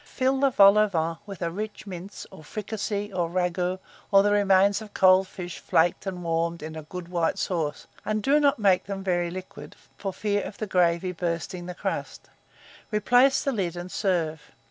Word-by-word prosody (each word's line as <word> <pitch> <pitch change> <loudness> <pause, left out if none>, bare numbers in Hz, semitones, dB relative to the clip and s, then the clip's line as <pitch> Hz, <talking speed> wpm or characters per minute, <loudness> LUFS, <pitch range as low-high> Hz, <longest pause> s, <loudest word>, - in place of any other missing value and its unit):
Fill 265 -1 0
the 275 0 +4
vol 200 -3 +6
au 215 - +4
vent 165 -3 -2
with 195 -3 -6
a 170 - -1
rich 210 +4 -6
mince, 190 0 -8
or - - -12
fricassee, 205 +2 -4
or 175 -2 -1
ragoût, 180 +1 -1 0.3
or 195 -1 +6
the 205 - +2
remains 200 0 +4
of 215 -1 -11
cold 185 0 +5
fish 180 -2 -7
flaked 170 +4 +1
and 180 -2 -4
warmed 165 0 -1
in 160 0 -7
a 160 - -6
good 170 +3 -8
white 170 -2 0
sauce, 160 -5 -2 0.2
and 215 0 -2
do 285 +5 +4
not 285 -2 +3
make 195 -4 +3
them 195 0 -5
very 175 -2 0
liquid, 175 -5 -9 0.2
for 195 - -3
fear 205 +1 -1
of 200 - -7
the 215 - -3
gravy 180 -1 +1
bursting 175 0 -4
the 180 - -6
crust: - - -5 0.6
replace 245 +6 +3
the 275 - 0
lid, 185 -8 -2
and 175 +1 -7
serve. 165 -6 -1
185 Hz, 190 wpm, -26 LUFS, 170-205 Hz, 0.6 s, vol